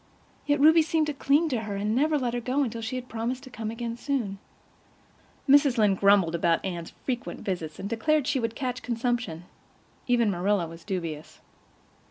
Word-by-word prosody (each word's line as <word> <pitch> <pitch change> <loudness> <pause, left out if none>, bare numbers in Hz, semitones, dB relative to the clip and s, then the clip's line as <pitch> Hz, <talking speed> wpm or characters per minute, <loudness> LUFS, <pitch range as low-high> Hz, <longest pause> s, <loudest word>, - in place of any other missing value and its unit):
Yet 290 0 +2
Ruby 320 +3 +7
seemed 320 0 +1
to 300 - -2
cling 285 +4 +2
to 250 -5 0
her, 210 -2 -4
and 210 +2 -1
never 300 +4 +2
let 245 -4 -1
her 245 - -1
go 260 +4 0
until 230 -3 -4
she 225 +3 -4
had 255 0 -5
promised 240 +3 -3
to 260 - -12
come 220 -2 -5
again 230 +1 -4
soon. 235 -8 -2 1.1
Mrs. 280 -2 +5
Lynde 205 -4 +3
grumbled 200 -4 +4
about 170 +1 +1
Anne's 170 -3 -5
frequent 245 -2 -3
visits, 170 -5 -4
and 200 - -5
declared 275 +7 +1
she 275 -1 +1
would 230 -1 -2
catch 250 -2 -3
consumption; 235 -8 -2 0.6
even 235 -4 +3
Marilla 190 0 +1
was 165 +1 -11
dubious. 165 -6 -5
235 Hz, 185 wpm, -27 LUFS, 200-265 Hz, 1.1 s, Ruby